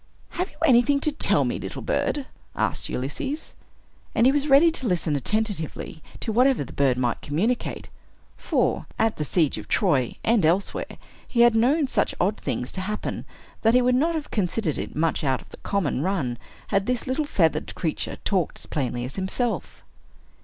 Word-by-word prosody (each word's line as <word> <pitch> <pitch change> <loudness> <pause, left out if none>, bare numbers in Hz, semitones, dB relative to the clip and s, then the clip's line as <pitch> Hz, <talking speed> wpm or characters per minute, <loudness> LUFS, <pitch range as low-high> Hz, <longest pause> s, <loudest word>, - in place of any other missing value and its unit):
"Have 365 +3 -3
you - - -21
anything 270 +1 +5
to 305 - +1
tell 295 - +2
me, - - -2
little - - -6
bird?" 285 -2 0 0.3
asked - - -1
Ulysses. 205 - -4 0.6
And 230 - +4
he 260 - +7
was 290 +1 +1
ready 295 +4 +6
to 275 -6 -3
listen 170 -5 +1
attentively 180 - -2 0.2
to 225 - -1
whatever 250 - +3
the - - -11
bird 135 -3 +2
might 125 -2 0
communicate; 210 +13 -1 0.5
for, - - 0
at 225 -1 +1
the 150 - -1
siege 155 0 +1
of - - -10
Troy, 145 - +1
and 225 -4 +3
elsewhere, 175 +5 0 0.3
he 235 - +2
had 240 -1 +7
known 265 +7 +3
such 265 - 0
odd 200 +4 +1
things 125 -2 -3
to 190 - -3
happen, 210 +3 -4 0.4
that 225 +2 +4
he 250 - +6
would 250 0 +3
not 320 +7 +2
have 310 -2 -4
considered 185 -4 -1
it - - -5
much 160 +1 0
out 130 -3 +1
of - - -16
the - - -12
common 180 -9 -1
run 145 -10 -1 0.3
had 195 -1 +1
this 250 -2 0
little 265 +4 0
feathered 165 - +1
creature 160 -3 -2
talked 185 -6 0
as - - -6
plainly 125 -4 -2
as 130 - -7
himself. 220 +5 -2
205 Hz, 180 wpm, -25 LUFS, 155-250 Hz, 0.6 s, he